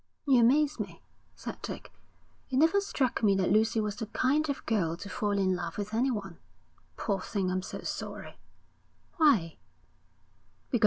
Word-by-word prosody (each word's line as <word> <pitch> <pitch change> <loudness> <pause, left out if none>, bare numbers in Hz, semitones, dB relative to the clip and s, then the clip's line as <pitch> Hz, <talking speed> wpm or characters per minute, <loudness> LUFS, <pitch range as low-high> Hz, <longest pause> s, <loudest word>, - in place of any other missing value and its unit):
'You 265 -4 +5
amaze 285 +5 +3
me,' - - -6 0.3
said - - -7
Dick. - - -7 0.6
'It 260 - 0
never 325 +8 +4
struck 270 -10 -1
me 200 -3 +4
that 185 -2 +1
Lucy 220 +2 +3
was 210 -1 -2
the 225 - -4
kind 285 +7 +1
of 280 - -3
girl 170 -7 0
to 200 +3 -8
fall 205 -1 0
in 190 -1 +2
love 170 -2 -5
with 210 +1 -4
anyone. 220 -7 -1 0.6
Poor 195 -3 -1
thing. 190 -2 -1
I'm 185 0 0
so - - -7
sorry.' - - -6 0.8
'Why?' 245 - +4
215 Hz, 155 wpm, -30 LUFS, 195-265 Hz, 0.8 s, You